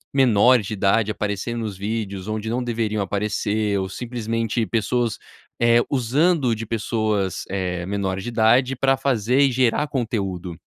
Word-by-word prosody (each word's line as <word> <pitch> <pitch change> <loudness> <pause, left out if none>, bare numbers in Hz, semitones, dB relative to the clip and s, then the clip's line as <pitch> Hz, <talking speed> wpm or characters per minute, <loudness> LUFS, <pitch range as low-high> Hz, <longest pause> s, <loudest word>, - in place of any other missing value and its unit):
menor 125 -1 +5
de 105 +2 -5
idade 105 +2 +2
aparecendo 105 +3 -3
nos 105 -3 -4
vídeos 100 -1 -4
onde 110 0 -3
não 125 +2 -1
deveriam 110 -3 -1
aparecer 105 +1 -1
ou 95 0 -3
simplesmente 115 0 -2
pessoas, 115 +2 0 0.4
eh, 120 0 +5
usando 140 +2 +2
de 110 0 -6
pessoas, 110 -3 -1
eh, 90 -2 -2
menores 95 -1 -2
de 120 - -4
idade 120 +3 +3
pra 135 +1 +2
fazer 125 -2 +1
e 140 -1 +4
gerar 130 +4 +1
conteúdo? 100 - -3
110 Hz, 145 wpm, -22 LUFS, 100-120 Hz, 0.4 s, menor